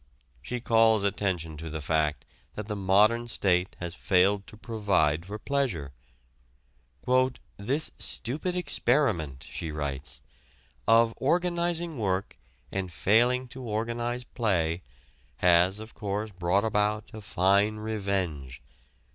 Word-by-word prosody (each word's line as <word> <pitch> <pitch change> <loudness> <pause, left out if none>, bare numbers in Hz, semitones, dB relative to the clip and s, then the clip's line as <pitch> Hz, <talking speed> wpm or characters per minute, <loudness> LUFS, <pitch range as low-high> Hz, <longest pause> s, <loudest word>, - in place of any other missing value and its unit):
She 125 - -4
calls 115 -2 +4
attention 90 -6 -1
to 80 +1 -6
the 80 +1 -4
fact 75 0 0 0.3
that 105 - -5
the 105 0 -4
modern 105 +5 +3
state 95 -5 +1
has 85 -1 -5
failed 95 +2 +2
to 110 - -12
provide 100 -9 0
for 105 +2 -5
pleasure. 110 - -2 1.6
"This 135 +10 -1
stupid 150 +9 -2
experiment," 120 - +1
she 80 - -5
writes, 70 -2 -4 0.7
"of 115 +1 +5
organizing 170 0 0
work 95 -2 -2 0.3
and 95 -2 -3
failing 120 - +3
to 130 +1 -9
organize 120 +2 -2
play 90 -9 0 0.6
has, 90 +3 +4
of 110 +1 -10
course, 105 0 -3
brought 95 +2 +1
about 105 0 0
a 110 - -8
fine 100 +2 +2
revenge. 95 - -3
105 Hz, 115 wpm, -28 LUFS, 90-115 Hz, 1.6 s, of